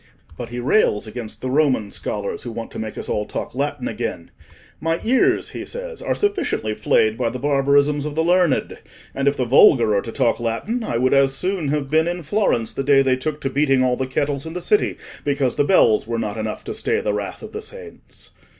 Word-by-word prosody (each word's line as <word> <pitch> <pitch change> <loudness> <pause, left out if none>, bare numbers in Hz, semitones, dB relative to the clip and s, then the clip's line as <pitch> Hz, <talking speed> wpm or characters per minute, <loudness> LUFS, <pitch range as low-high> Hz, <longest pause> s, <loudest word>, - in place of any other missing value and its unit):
But 120 +6 -7
he 120 +1 -5
rails 120 - +2
against 110 0 -7
the 130 - -3
Roman 130 -8 +2
scholars 100 -1 -4
who 120 - -6
want 115 0 -6
to - - -7
make 110 -1 -5
us - - -5
all 105 0 -2
talk - - -5
Latin - - -2
again: - - -4 0.5
'My 165 +1 -1
ears,' 265 +11 +2
he - - -6
says, - - -7
'are - - -1
sufficiently 390 - -1
flayed 110 +1 +1
by 120 -2 +1
the 130 - -5
barbarisms 140 +1 +2
of 150 -1 -4
the 160 - +1
learned, 175 -3 +2 0.3
and 135 +1 -1
if 140 - +2
the 125 - 0
vulgar 120 -3 +5
are 100 - +2
to 115 - -7
talk 115 - +1
Latin 120 - -2
I 120 - -2
would 130 +2 +2
as 135 -1 +4
soon 180 -1 -1
have 140 -1 -2
been 160 +1 +3
in 175 0 -3
Florence 155 - 0
the - - -2
day 135 0 +5
they 130 -1 +2
took 150 +3 -4
to 135 - -1
beating 135 -2 +2
all 125 -1 +2
the 130 +1 -3
kettles 140 +1 -1
in 160 - -6
the 180 - -4
city 210 +4 +2 0.3
because 140 -4 0
the - - +1
bells 115 - +4
were 115 0 -2
not 105 -3 -3
enough 110 -1 -4
to - - -5
stay 445 - 0
the - - -1
wrath - - -5
of - - -8
the 435 - -6
saints. 450 0 -10
140 Hz, 225 wpm, -21 LUFS, 120-175 Hz, 0.5 s, vulgar